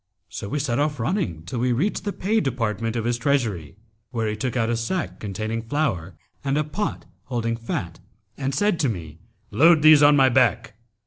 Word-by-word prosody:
So 100 Hz, -, -6 dB
we 150 Hz, -, -2 dB
set 135 Hz, -3 st, -1 dB
off 150 Hz, -1 st, 0 dB
running 120 Hz, -, -2 dB
till 95 Hz, +8 st, -5 dB
we 125 Hz, +1 st, +1 dB
reached 180 Hz, -, -1 dB
the 205 Hz, -, -1 dB
pay 210 Hz, +4 st, 0 dB
department 115 Hz, -, -2 dB
of 115 Hz, -1 st, -2 dB
his 120 Hz, 0 st, 0 dB
treasury, 110 Hz, -, -1 dB, 0.3 s
where 115 Hz, -3 st, -2 dB
he 105 Hz, -, -2 dB
took 125 Hz, +3 st, -3 dB
out 115 Hz, -1 st, +1 dB
a -, -, +1 dB
sack 130 Hz, +10 st, -3 dB
containing 110 Hz, +3 st, -3 dB
flour 115 Hz, -, -2 dB, 0.3 s
and 140 Hz, +1 st, 0 dB
a 150 Hz, -, +2 dB
pot 180 Hz, +8 st, -4 dB, 0.2 s
holding 115 Hz, -3 st, -2 dB
fat 95 Hz, -7 st, -5 dB, 0.4 s
and 135 Hz, 0 st, -3 dB
said 205 Hz, +1 st, +1 dB
to 140 Hz, -, +2 dB
me, 80 Hz, -6 st, -6 dB, 0.3 s
'Load 160 Hz, +1 st, +5 dB
these 155 Hz, -1 st, +8 dB
on 145 Hz, 0 st, +7 dB
my 135 Hz, -2 st, +5 dB
back!' 125 Hz, -4 st, +2 dB
125 Hz, 195 wpm, -23 LUFS, 110-145 Hz, 0.4 s, these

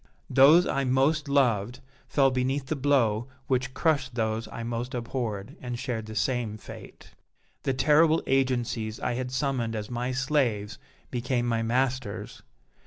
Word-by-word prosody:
Those 145 Hz, +7 st, +7 dB
I 140 Hz, -, 0 dB
most 140 Hz, +3 st, +2 dB
loved 125 Hz, -4 st, +2 dB, 0.3 s
fell 135 Hz, -2 st, +3 dB
beneath 130 Hz, +2 st, -1 dB
the 155 Hz, -, -2 dB
blow 130 Hz, -5 st, +2 dB, 0.2 s
which 130 Hz, 0 st, -1 dB
crushed 140 Hz, -6 st, +1 dB
those 110 Hz, -1 st, -1 dB
I 115 Hz, -, -7 dB
most 120 Hz, +2 st, -4 dB
abhorred, 115 Hz, -4 st, -4 dB
and 125 Hz, -1 st, -4 dB
shared 120 Hz, -4 st, -4 dB
the 110 Hz, -, -8 dB
same 120 Hz, -3 st, -1 dB
fate. -, -, -12 dB, 0.5 s
The 135 Hz, -, -1 dB
terrible 155 Hz, +4 st, +4 dB
agencies 120 Hz, -4 st, 0 dB
I 125 Hz, -, -1 dB
had 125 Hz, +1 st, -3 dB
summoned 130 Hz, -4 st, -1 dB
as 105 Hz, +2 st, -5 dB
my 125 Hz, +1 st, -2 dB
slaves 125 Hz, -7 st, 0 dB, 0.3 s
became 125 Hz, 0 st, -1 dB
my 115 Hz, -1 st, 0 dB
masters. 125 Hz, -1 st, -2 dB
125 Hz, 145 wpm, -27 LUFS, 115-135 Hz, 0.5 s, Those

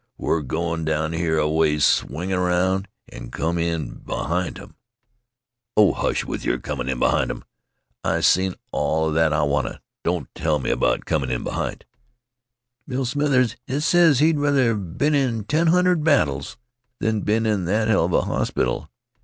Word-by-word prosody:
We're 80 Hz, -, 0 dB
goin' 80 Hz, +4 st, -2 dB
down 80 Hz, 0 st, -1 dB
here 80 Hz, -1 st, 0 dB
aways, 75 Hz, -1 st, +2 dB
swing 85 Hz, +8 st, 0 dB
aroun', 90 Hz, +2 st, +1 dB, 0.2 s
an' -, -, -9 dB
come 85 Hz, +5 st, -2 dB
in 85 Hz, -1 st, -2 dB
behint 85 Hz, +4 st, -2 dB
'em." 100 Hz, +1 st, -13 dB, 1.0 s
"Oh, 105 Hz, -2 st, +6 dB
hush, -, -, -1 dB
with -, -, -5 dB
your -, -, 0 dB
comin' 65 Hz, -3 st, -4 dB
in 65 Hz, -, -1 dB
behint -, -, +2 dB
'em. -, -, -5 dB, 0.6 s
I've -, -, +1 dB
seen 95 Hz, 0 st, +3 dB, 0.2 s
all 80 Hz, +2 st, 0 dB
'a -, -, -2 dB
that 80 Hz, 0 st, +3 dB
I 75 Hz, 0 st, +1 dB
wanta. 70 Hz, -2 st, -1 dB, 0.2 s
Don't -, -, -1 dB
tell 80 Hz, -1 st, 0 dB
me 65 Hz, -, -2 dB
about -, -, +1 dB
comin' 70 Hz, -5 st, -1 dB
in 65 Hz, -1 st, -2 dB
behint -, -, -4 dB, 0.5 s
" 120 Hz, 0 st, -56 dB
"Bill 130 Hz, -1 st, -2 dB
Smithers, 130 Hz, -3 st, +1 dB
he 135 Hz, +3 st, -1 dB
ses 165 Hz, -2 st, +4 dB
he'd 155 Hz, +2 st, +3 dB
rather 140 Hz, -5 st, +2 dB
been 105 Hz, -, -1 dB
in 125 Hz, -6 st, +1 dB
ten 155 Hz, +10 st, +1 dB
hundred 180 Hz, -1 st, +3 dB
battles 75 Hz, -, +1 dB, 0.4 s
than 110 Hz, -1 st, 0 dB
been 110 Hz, +3 st, +1 dB
in 105 Hz, -5 st, 0 dB
that 105 Hz, +4 st, +1 dB
heluva 90 Hz, -6 st, +2 dB
hospital. 65 Hz, +5 st, -1 dB
90 Hz, 160 wpm, -22 LUFS, 80-125 Hz, 1.0 s, Oh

